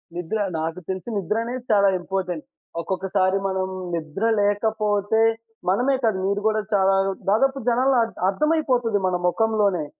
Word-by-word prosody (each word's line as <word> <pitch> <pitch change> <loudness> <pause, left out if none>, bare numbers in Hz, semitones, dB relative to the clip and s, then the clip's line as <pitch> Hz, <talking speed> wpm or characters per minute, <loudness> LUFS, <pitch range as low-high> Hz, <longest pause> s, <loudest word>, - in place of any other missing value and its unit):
నిద్ర. 180 +5 -3 0.2
నాకు 165 +2 -3
తెలిసి 190 +5 -4
నిద్రనేది 230 +6 -2
చాలా 200 -1 +5
ఇంపార్టెంట్. 180 -3 -3 0.4
ఒకొక్కసారి 190 +1 0
మనం 190 -1 -1 0.3
నిద్ర 160 +5 -5 0.2
లేకపోతే 205 0 +1 0.5
మనమే 250 +8 +2
కాదు, 220 -4 +2
మీరు 200 +1 0
కూడా 215 0 +1
చాలా 195 -1 +4 0.4
దాదాపు 270 +6 +2
జనాల్లో 255 +2 +3
అ - - +1 0.2
అర్థమైపోతది 250 -4 +1
మన 180 - 0
మొఖంలోనే. 200 -3 +1
205 Hz, 125 wpm, -23 LUFS, 190-225 Hz, 0.5 s, చాలా